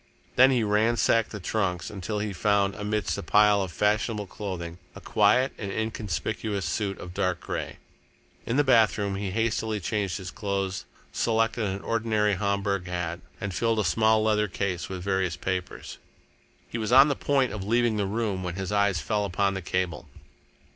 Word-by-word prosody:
Then 130 +1 +7
he 125 -4 +2
ransacked 110 +1 +2
the 105 - -7
trunks 90 -2 -2
until 105 +1 -4
he 105 -1 -2
found, 100 +1 +2
amidst 105 0 -2
a - - -3
pile 105 0 +4
of 95 -2 -3
fashionable 105 +2 0
clothing, 90 -4 -6 0.2
a - - -8
quiet 115 +6 +3
and 100 -2 -4
inconspicuous 110 -1 -3
suit 100 +3 -2
of 90 - -9
dark 90 -2 0
grey. - - -5 0.7
In 115 - 0
the 145 - +5
bathroom 110 -6 +3
he 100 0 -3
hastily 110 +1 -1
changed 100 0 -2
his 95 -2 -7
clothes, 100 -2 -3 0.3
selected 115 0 +1
an 100 0 -3
ordinary 110 -2 +1
Homburg 100 -1 -1
hat, 90 -1 -3 0.2
and 100 -2 -4
filled 115 +1 +1
a 110 - +2
small 110 +4 +3
leather 105 -1 +2
case 95 -2 -3
with 95 -2 -5
various 95 -5 0
papers. 95 -1 -4 0.7
He 115 - -5
was 110 +1 -2
on 135 +3 +8
the 145 - 0
point 135 -5 +1
of 105 -3 -4
leaving 115 +1 +2
the 100 -2 0
room 105 -2 -1
when 90 -1 -4
his 95 0 -4
eyes 100 -4 +2
fell 105 +8 0
upon 100 0 0
the 95 - -4
cable. 85 -3 -2
105 Hz, 175 wpm, -27 LUFS, 95-110 Hz, 0.7 s, on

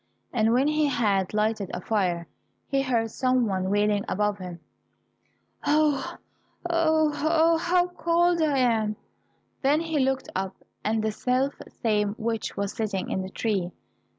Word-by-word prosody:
And 225 -2 +2
when 255 +4 +3
he 305 0 +2
had 210 -8 +1
lighted 210 -2 0
a - - -3
fire, 180 -4 0 0.4
he 275 0 0
heard 230 -4 0
some 255 -1 +2
one 190 -3 -1
wailing 205 0 +2
above 210 0 0
him, 180 -2 -7 1.0
"Oh, 295 -2 +1 0.5
oh, 315 -2 +3
oh, 325 +1 +4
how 350 +1 +2
cold 345 0 +2
I 300 -3 +2
am!" 225 -4 +2 0.7
Then 290 +3 +3
he 325 -2 -1
looked 265 0 0
up, 190 0 -2 0.3
and 220 0 0
the 220 - +1
self 255 +5 0 0.3
same 210 -2 +1
witch 225 -1 -3
was 200 0 -2
sitting 210 -5 -3
in 190 - -1
the 190 - -5
tree. 195 -4 -1
230 Hz, 150 wpm, -26 LUFS, 205-295 Hz, 1.0 s, oh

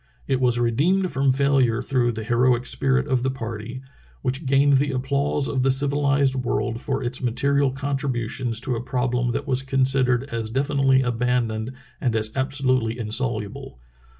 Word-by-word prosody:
It 135 -2 +1
was 120 -2 +2
re 120 -1 +2
deemed 185 +9 +1
from 135 0 +2
failure 135 -3 +2
through 125 -2 0
the 110 0 -5
heroic 120 +2 +2
spirit 135 +1 +1
of 130 -3 +1
the 130 - 0
party, 120 0 -6 0.4
which 135 +3 -2
gained 140 +1 +4
the 145 +2 +1
applause 140 +2 0
of 130 - -1
the 135 - +2
civilized 140 0 +2
world 125 -2 -2
for 135 -1 -2
its 125 +1 -3
material 140 +3 +1
contributions 130 -4 -2
to 130 -1 -1
a 115 - -3
problem 125 -1 -1
that 140 - -3
was 130 -3 0
considered 130 -2 +1
as 115 -1 -3
definitely 135 +1 +2
abandoned 120 -1 -1 0.3
and 120 -4 0
as 110 0 0
absolutely 130 -4 0
insoluble. 110 - -3
130 Hz, 160 wpm, -23 LUFS, 120-135 Hz, 0.4 s, gained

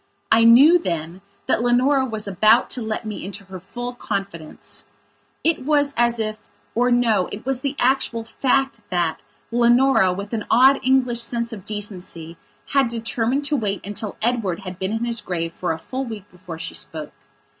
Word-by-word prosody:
I 230 +1 +6
knew 280 +10 +8
then 170 - -4 0.2
that - - +1
Leonora 255 +3 +3
was 220 -3 -4
about 215 +5 +4
to 250 - -1
let 220 0 -3
me 215 -1 -5
into 195 +1 -6
her 190 -1 -9
full 245 +7 -6
confidence. 195 -9 -6 0.6
It 325 -4 +1
was 290 0 +2
as 235 0 +2
ifor 220 +2 -3
no, 230 -6 +2
it 210 - -7
was 265 -1 -1
the 275 +1 -2
actual 250 -3 +1
fact 265 +1 0
thatLeonora 235 +5 +2
with 200 +3 -6
an 220 -2 -2
odd 265 +4 +6
English 255 -2 +2
sense 235 0 -2
of 200 -3 -9
decency 185 -6 -6 0.3
had 275 -2 +3
determined 230 +4 -1
to 295 - +1
wait 205 -7 -2
until 205 +1 -5
Edward 220 -7 0
had 185 -1 -8
been 190 +1 -2
in 225 +2 -1
his 235 -1 0
grave 165 -2 -3
for 180 - -2
a 160 - -2
full 260 +11 -5
week 220 -5 -7
before 180 -2 -9
she - - -5
spoke. 155 -2 -5
225 Hz, 170 wpm, -22 LUFS, 190-250 Hz, 0.6 s, knew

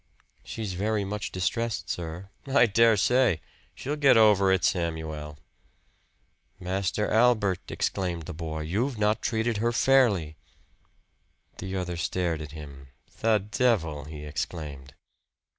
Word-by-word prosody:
"She's 110 -4 -5
very 105 +2 -1
much 105 +1 -4
distressed, 115 +5 -2
sir." 90 +3 -5 0.2
"I 135 -3 +5
dare 115 0 +4
say. 120 -4 +3 0.4
She'll 145 +3 -3
get 140 -5 +5
over 105 -3 +5
it, 95 -2 +2
Samuel." 80 -3 -2 1.2
"Master 95 +2 -1
Albert," 110 -5 +2
exclaimed 90 -4 -2
the - - -7
boy, 80 -1 -5
"you've 110 - -1
not 105 +1 +1
treated 115 -1 0
her 115 +3 +1
fairly." 115 - +3 1.2
The 95 0 -4
other 90 -2 -3
stared 85 -1 -1
at 75 -1 -8
him. 70 -3 -10 0.3
"The 110 -1 +4
devil!" 85 - +1
he 75 -1 -8
exclaimed. 70 -3 -6
95 Hz, 125 wpm, -27 LUFS, 80-110 Hz, 1.2 s, I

